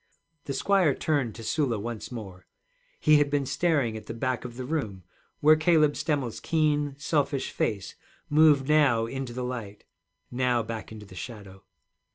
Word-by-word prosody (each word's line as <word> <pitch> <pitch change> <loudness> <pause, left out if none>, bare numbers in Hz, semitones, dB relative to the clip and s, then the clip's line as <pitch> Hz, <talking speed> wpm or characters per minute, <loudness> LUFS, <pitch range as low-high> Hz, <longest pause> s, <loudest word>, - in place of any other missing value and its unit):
The 140 - -3
squire 180 0 +3
turned 140 -8 -1
to 115 - -9
Sula 130 -2 0
once 115 +3 -6
more. 95 -6 -9 0.5
He 155 0 +5
had 145 -1 +2
been 145 -1 0
staring 140 -7 +1
at 110 - -9
the 115 - -5
back 125 0 -2
of 120 -1 -8
the 130 - -5
room, 110 - -3 0.4
where 155 +1 +7
Cabel 155 -2 +3
Stemmel's 145 -6 -2
keen, 150 -3 +1
selfish 145 -2 -1
face 100 -3 -2 0.3
moved 145 -3 +5
now 145 -7 +4
into 135 +1 -5
the 125 +1 -4
light, 115 -5 -6 0.5
now 125 -1 +1
back 110 0 -6
into 105 -1 -9
the 95 - -14
shadow. 100 -2 -9
130 Hz, 165 wpm, -27 LUFS, 115-150 Hz, 0.5 s, where